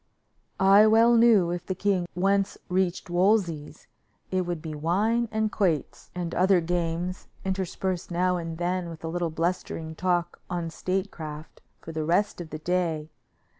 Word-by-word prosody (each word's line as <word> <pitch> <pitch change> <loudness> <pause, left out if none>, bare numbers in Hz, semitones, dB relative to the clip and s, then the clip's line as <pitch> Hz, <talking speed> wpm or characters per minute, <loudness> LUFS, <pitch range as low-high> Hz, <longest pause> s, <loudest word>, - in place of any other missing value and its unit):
I 195 +3 +7
well 230 +2 +6
knew 225 -7 +5
if 175 0 -4
the 185 - -2
king 190 -3 0
once 195 +2 +1
reached 180 -1 0
Wolsey's, 175 -5 +1 0.5
it 185 -1 0
would 175 -2 -2
be 155 -1 -6
wine 210 +10 +1
and 220 -1 0
quoits 175 -8 -1
and 175 -2 -3
other 185 0 +4
games, 175 +1 -2 0.2
interspersed 190 -1 -2
now 180 +1 +1
and 165 -1 -5
then 175 0 -1
with 165 -1 -10
a - - -3
little 175 0 -1
blustering 165 -1 -2
talk 175 +1 -1
on 170 -2 -3
statecraft, 165 -4 -4 0.2
for 165 - -8
the 160 -1 -3
rest 175 +4 +1
of 165 - -8
the 155 - -5
day. 160 -2 -1
175 Hz, 155 wpm, -26 LUFS, 165-190 Hz, 0.5 s, I